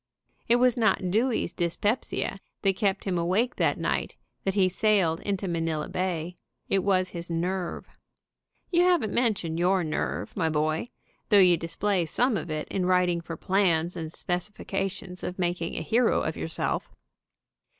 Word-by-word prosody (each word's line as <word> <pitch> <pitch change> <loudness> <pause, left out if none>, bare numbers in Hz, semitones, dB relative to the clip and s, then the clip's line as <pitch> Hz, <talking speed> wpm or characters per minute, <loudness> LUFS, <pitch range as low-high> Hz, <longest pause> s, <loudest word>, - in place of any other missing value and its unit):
It 235 - +5
was 250 0 +3
not 215 -5 +2
Dewey's 230 +4 +1
dyspepsia 195 +3 -1 0.2
that 195 -1 +3
kept 195 -1 0
him 180 -3 -1
awake 190 +9 +1
that - - +2
night - - -1 0.3
that 195 0 0
he 190 -2 +4
sailed 185 -4 +2
into 195 -1 -2
Manila 165 -3 -1
Bay. 180 -2 -3 0.3
It 195 - +2
was 185 -1 +2
his 170 -1 -6
nerve. 175 +2 -2 0.9
You 345 -1 +4
haven't 350 - +3
mentioned 195 -9 0
your 180 +1 +3
nerve, 155 -1 -3
my 165 -4 +1
boy, 155 +5 0 0.4
though 205 - +6
you 180 -3 +7
display 170 +3 -1
some 245 - +2
of 175 - -3
it 155 0 -3
in 185 -2 -1
writing 180 -2 +2
for 165 -1 -7
plans 180 -3 +2
and 160 -2 -4
specifi 180 +5 -4
cations 195 -2 -3
for 180 +1 -5
making 175 -1 -1
a - - -2
hero 235 +1 +2
of - - -2
yourself. - - -2
185 Hz, 160 wpm, -27 LUFS, 170-205 Hz, 0.9 s, you